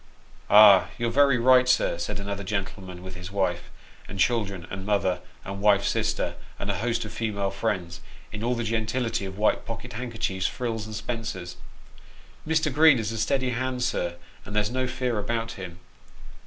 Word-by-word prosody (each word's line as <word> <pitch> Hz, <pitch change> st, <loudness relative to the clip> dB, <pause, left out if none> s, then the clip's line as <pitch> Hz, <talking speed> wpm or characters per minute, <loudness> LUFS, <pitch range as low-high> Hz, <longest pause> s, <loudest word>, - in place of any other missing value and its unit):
" -, -, -26 dB
Ah, 105 Hz, -2 st, +8 dB
you're 120 Hz, -1 st, -1 dB
very 140 Hz, 0 st, +4 dB
right, 125 Hz, +1 st, +5 dB
sir," 125 Hz, -8 st, +2 dB
said 85 Hz, +2 st, -3 dB
another 100 Hz, 0 st, -4 dB
gentleman, 95 Hz, -2 st, -4 dB
with 95 Hz, 0 st, -8 dB
his 90 Hz, +1 st, -8 dB
wife, 95 Hz, -3 st, -1 dB, 0.4 s
and 100 Hz, -, -8 dB
children, 100 Hz, -6 st, +1 dB
and 95 Hz, 0 st, -5 dB
mother, 95 Hz, -3 st, +1 dB, 0.3 s
and 100 Hz, 0 st, -6 dB
wife's 100 Hz, -1 st, +4 dB
sister, -, -, -1 dB, 0.2 s
and 100 Hz, -, -2 dB
a 100 Hz, -, -3 dB
host 115 Hz, 0 st, -1 dB
of 105 Hz, -, -8 dB
female 100 Hz, -3 st, -2 dB
friends, 95 Hz, -4 st, -3 dB, 0.3 s
in 105 Hz, +1 st, -6 dB
all 125 Hz, +1 st, +1 dB
the 120 Hz, -, -2 dB
gentility 110 Hz, 0 st, -1 dB
of 95 Hz, 0 st, -7 dB
white 105 Hz, +1 st, +2 dB
pocket 120 Hz, +1 st, -7 dB
handkerchiefs, 110 Hz, -6 st, -2 dB
frills, 115 Hz, -3 st, -3 dB
and 110 Hz, -, -7 dB
spencers, 115 Hz, -6 st, -5 dB, 0.4 s
" -, -, -23 dB
Mr. 160 Hz, -2 st, +1 dB
Green 155 Hz, -1 st, +7 dB
is 110 Hz, -1 st, -2 dB
a 115 Hz, -, -4 dB
steady 130 Hz, +3 st, +1 dB
hand, 125 Hz, +1 st, -2 dB
sir, 85 Hz, -6 st, -1 dB, 0.3 s
and 105 Hz, -, -8 dB
there's 105 Hz, +1 st, +1 dB
no 130 Hz, 0 st, -1 dB
fear 125 Hz, -3 st, -1 dB
about 115 Hz, +2 st, -2 dB
him." 90 Hz, -4 st, -8 dB
110 Hz, 180 wpm, -26 LUFS, 95-120 Hz, 0.4 s, Ah